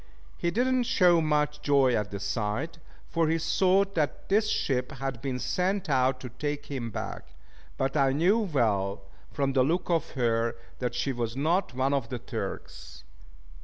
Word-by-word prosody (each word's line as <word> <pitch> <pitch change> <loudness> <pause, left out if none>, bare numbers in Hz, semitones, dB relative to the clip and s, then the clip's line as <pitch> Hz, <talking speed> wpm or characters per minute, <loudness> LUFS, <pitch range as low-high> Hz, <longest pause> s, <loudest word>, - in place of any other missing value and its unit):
He 170 - -1
did 235 +8 +1
not 255 -2 +1
show 175 -8 +5
much 150 -1 0
joy 140 -4 +4
at 105 -3 0
the 100 - -5
sight, 105 - -2 0.3
for 165 -1 +1
he 165 - +2
thought 190 +4 +2
that 150 -5 -2
this 215 +2 +3
ship 125 -4 0
had 135 -3 -4
been 135 -2 -2
sent 185 +6 -1
out 130 0 +2
to 125 - -6
take 145 +4 -4
him 130 -5 -4
back: - - -6 0.5
but 135 +2 -1
I 135 -2 +4
knew 175 +11 +3
well, 105 - 0 0.3
from 135 -1 0
the 130 - +4
look 170 +7 +1
of 165 -1 +1
her, 115 -2 +1 0.2
that 125 -1 -2
she 130 +2 -1
was 120 -2 -3
not 165 0 +1
one 130 +2 +1
of 135 -5 -1
the 125 - -3
Turk's. 70 - -7
140 Hz, 175 wpm, -28 LUFS, 125-170 Hz, 0.5 s, show